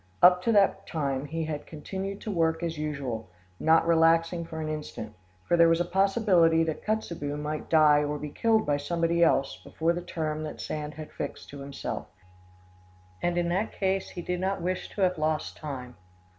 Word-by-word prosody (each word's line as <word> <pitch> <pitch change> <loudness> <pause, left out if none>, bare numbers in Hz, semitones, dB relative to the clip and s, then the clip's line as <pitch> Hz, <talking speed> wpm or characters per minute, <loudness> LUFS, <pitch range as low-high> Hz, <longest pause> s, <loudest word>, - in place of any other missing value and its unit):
Up 180 0 +8
to 230 - +3
that 200 -2 +3
time 140 -4 -2
he 165 +2 -3
had 150 -2 -5
continued 195 +5 -5
to 215 - -4
work 165 -2 +1
as 165 -1 -2
usual, 140 -9 -4 0.3
not 160 +1 +4
relaxing 165 +1 +3
for 160 -1 -7
an 155 - -3
instant; 150 -8 -5 0.3
for - - +3
there 170 -1 +6
was 165 0 +3
a 175 - +1
possibility 185 -3 +3
that 160 -1 -3
Kotzebue 170 -9 -2
might 150 +1 -4
die 150 -2 +5
or 150 0 -2
be 150 0 -6
killed 225 +3 +2
by 145 -1 +1
somebody 170 +3 +1
else 135 -4 +2
before 165 +1 0
the 175 - -3
term 155 -3 -3
that 155 -1 -6
Sand 150 -1 -4
had 155 0 -8
fixed 145 - -6
to 140 - -9
himself, 140 0 -5 1.1
and 175 0 0
in 175 0 +1
that 190 +5 -1
case 190 0 -1
he 175 - -7
did 180 +1 -2
not 190 +1 -1
wish 180 +2 -2
to 205 - -5
have 180 -3 +2
lost 155 0 -1
time. 130 -5 -7
165 Hz, 190 wpm, -28 LUFS, 150-175 Hz, 1.1 s, Up